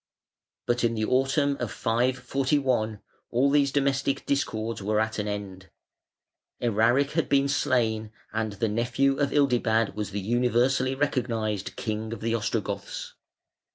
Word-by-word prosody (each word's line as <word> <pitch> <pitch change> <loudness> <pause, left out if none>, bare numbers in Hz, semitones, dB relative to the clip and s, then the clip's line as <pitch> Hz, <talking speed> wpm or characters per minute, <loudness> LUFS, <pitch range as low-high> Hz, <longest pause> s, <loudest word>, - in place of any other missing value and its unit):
But 120 0 0
in 115 0 +2
the 110 -1 0
autumn 135 +3 +2
of 120 -5 -3
541 125 -1 0 0.3
all 130 +4 +2
these 140 -1 +3
domestic 140 -1 0
discords 115 -6 -1
were 105 +2 +1
at 110 0 -1
an 105 - -2
end; 100 -2 -6 0.9
Eraric 120 +5 +2
had 165 -1 0
been 140 0 +3
slain, 110 -5 0 0.2
and 110 -1 -1
the 110 +3 -1
nephew 120 +5 +1
of 140 -1 +1
Ildibad 120 -6 +2
was 105 -2 -4
the 100 +1 -3
universally 125 +4 +1
recognised 115 -7 -1
king 110 0 -3
of - - -8
the 115 +1 0
Ostrogoths. 110 -2 -3
120 Hz, 135 wpm, -27 LUFS, 110-135 Hz, 0.9 s, these